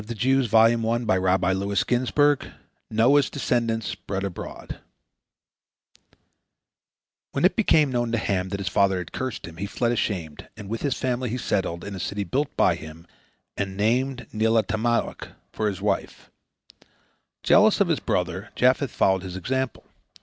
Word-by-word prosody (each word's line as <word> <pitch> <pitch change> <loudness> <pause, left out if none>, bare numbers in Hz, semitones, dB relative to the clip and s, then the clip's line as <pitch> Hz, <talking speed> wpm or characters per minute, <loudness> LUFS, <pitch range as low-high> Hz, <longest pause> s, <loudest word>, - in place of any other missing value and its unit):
NOAH'S 120 +3 +1 2.8
DESCENDANTS 115 -5 -1
SPREAD 95 -1 -4
ABROAD 95 -3 -7 2.5
When - - +1
it - - +4
became 150 -4 +3
known 120 -2 -1
to 115 - +1
Ham 95 -4 -1
that 100 - -4
his 100 - -4
father 95 0 +2
had 90 - -6
cursed 130 -1 -4
him, 80 -1 -11
he 100 +3 -4
fled 120 +3 -1
ashamed, 90 -10 -3
and 105 -3 -9
with 115 +1 -3
his 140 -3 0
family 125 -1 -1
he 120 - -2
settled 95 -7 -2
in 100 - -6
the 95 - -6
city 100 +3 -3
built 140 +7 -1
by - - +4
him, 80 +2 -10 0.5
and 95 -1 -4
named 125 +4 0
Neelatamauk 110 +1 0 0.2
for 110 - -1
his 100 -3 -4
wife. - - -2 1.1
Jealous - - +5
of - - +3
his - - +1
brother, - - -2
Japheth - - +3
followed 95 -1 +2
his 90 -1 -7
example. 130 +5 -3
110 Hz, 135 wpm, -24 LUFS, 95-120 Hz, 2.8 s, Jealous